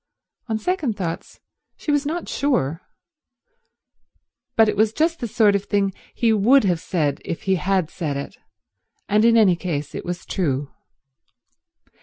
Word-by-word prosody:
On 220 - 0
second 280 - -1
thoughts 170 -4 -5 0.4
she 300 - -2
was 290 0 +1
not 335 +3 -3
sure, 185 - 0 1.7
but 225 -1 +5
it 210 - 0
was 215 +1 +2
just 330 +3 +1
the 240 - -3
sort 210 -2 +3
of 200 0 -1
thing 200 -2 0 0.2
he 230 -2 +2
would 230 +6 +5
have 180 -4 +1
said 150 -6 -1
if 165 - -5
he 190 - +1
had 185 -2 0
said 150 -6 -3
it, 140 +8 -6 0.7
and 210 +1 +3
in 230 0 +5
any 200 -5 +5
case 150 -5 -4
it - - -5
was 175 0 -5
true. 145 -6 -2
200 Hz, 155 wpm, -22 LUFS, 175-230 Hz, 1.7 s, but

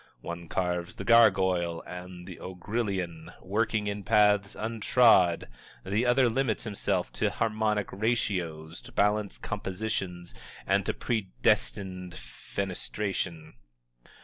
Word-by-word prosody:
One 85 0 -6
carves 90 0 -2
the - - -6
gargoyle 95 -7 +4
and 90 0 -9
ogrillion, 90 -2 -4
working 110 +2 0
in 100 0 -3
paths 105 0 +3
untrod, 110 -5 +4 0.4
the 105 +6 +1
other 125 +1 +5
limits 120 -1 0
himself 105 -3 -1
to - - 0
harmonic 110 -2 0
ratios, 90 -7 -1
balanced 105 0 0
compositions, 95 -3 -3 0.3
and - - +2
to - - 0
predestined 95 -4 -1
fenestration. 85 +4 -4
100 Hz, 95 wpm, -28 LUFS, 90-110 Hz, 0.4 s, other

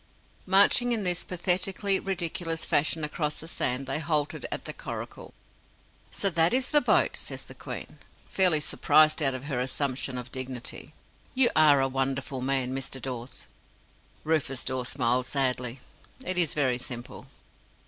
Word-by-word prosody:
Marching 200 +6 +5
in 220 -3 -1
this 180 -1 -1
pathetically 190 +2 +1
ridiculous 170 -3 -2
fashion 155 +2 +1
across 150 0 -2
the 160 - -7
sand, 130 -5 0
they 135 +3 -1
halted 150 -2 -1
at - - -3
the - - -5
coracle. - - -8 0.8
"So 195 - 0
that 165 +5 +3
is 260 0 +1
the 295 - +5
boat!" - - +2
says - - -6
the - - -12
Queen, - - -8 0.3
fairly 180 -5 +4
surprised 155 +1 +3
out 135 -3 +3
of 130 - -7
her 140 -4 -3
assumption 130 0 -2
of 125 0 -7
dignity. 130 -2 -4 0.4
"You 255 -2 +5
are 150 -3 +6
a 135 - +2
Wonderful 135 0 -2
Man, 130 -1 -1
Mr. 135 0 -4
Dawes!" 125 -1 -6 0.8
Rufus 145 -5 -1
Dawes 130 -1 -2
smiled 125 -1 0
sadly. 125 -2 -1 0.4
"It 185 -1 +2
is 165 -4 +4
very 130 -4 +1
simple." 125 -2 -7
145 Hz, 150 wpm, -27 LUFS, 130-170 Hz, 0.8 s, are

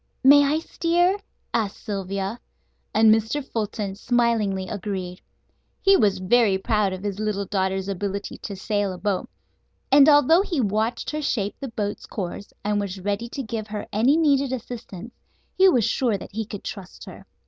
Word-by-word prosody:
"May 285 +2 +8
I 285 +2 +2
steer?" 350 +4 +1 0.3
asked 215 -4 -1
Sylvia, 195 +2 -3 0.5
and 220 0 +6
Mr. 225 +6 -1
Fulton 210 -4 -3
smilingly 215 -4 0
agreed. 185 -3 -5 0.6
He 390 0 +5
was 205 - +3
very 195 +1 +3
proud 205 0 +1
of 185 +1 -6
his 205 -1 -3
little 210 -2 -1
daughter's 190 -1 -1
ability 200 +1 -4
to 200 - -6
sail 205 0 -1
a - - -8
boat, 200 0 -2 0.6
and 280 +2 +8
although 295 +4 +6
he 355 -7 -2
watched 220 +1 -1
her 305 0 -3
shape 210 -8 -1
the 275 - -5
boat's 210 -3 -4
course, 195 0 -6
and 210 0 0
was 200 -1 -4
ready 205 +4 -2
to 275 - -5
give 220 -2 -4
her 210 -1 -5
any 245 +9 +4
needed 280 -4 +2
assistance, 235 -3 -7 0.4
he 380 0 +6
was 245 - +3
sure 235 -6 +1
that - - -10
he 220 +2 -3
could 205 -2 -8
trust 190 -3 -8
her. - - -12
215 Hz, 170 wpm, -24 LUFS, 200-250 Hz, 0.6 s, May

